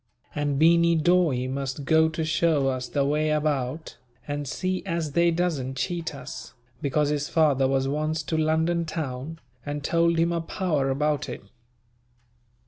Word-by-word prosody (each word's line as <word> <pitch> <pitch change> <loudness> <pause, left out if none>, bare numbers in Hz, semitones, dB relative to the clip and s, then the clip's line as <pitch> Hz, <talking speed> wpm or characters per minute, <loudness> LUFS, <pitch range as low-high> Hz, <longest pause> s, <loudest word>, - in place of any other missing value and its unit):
And 145 -1 -1
Beany 170 +2 +5
Dawe 160 -6 +2
must 135 +1 -4
go 160 +2 +4
to 160 0 -3
show 155 -3 +2
us 130 -1 -3
the 140 -2 0
way 150 +2 +1
about, 150 -2 -1 0.3
and 145 -1 -3
see 185 +6 -2
as 170 -5 -2
they 170 +3 +3
doesn't 160 -7 -1
cheat 165 +2 -3
us, 135 - -9 0.3
because 145 +1 +1
his 150 0 -1
father 145 -5 +3
was 135 0 +1
once 155 +2 -1
to 160 - -3
London 160 +2 +1
town, 155 -1 -5 0.3
and 145 0 -4
told 170 +2 +2
him 165 +1 +2
a 170 -1 -1
power 160 -6 -1
about 150 +1 0
it. - - -7
155 Hz, 155 wpm, -25 LUFS, 140-165 Hz, 0.3 s, Beany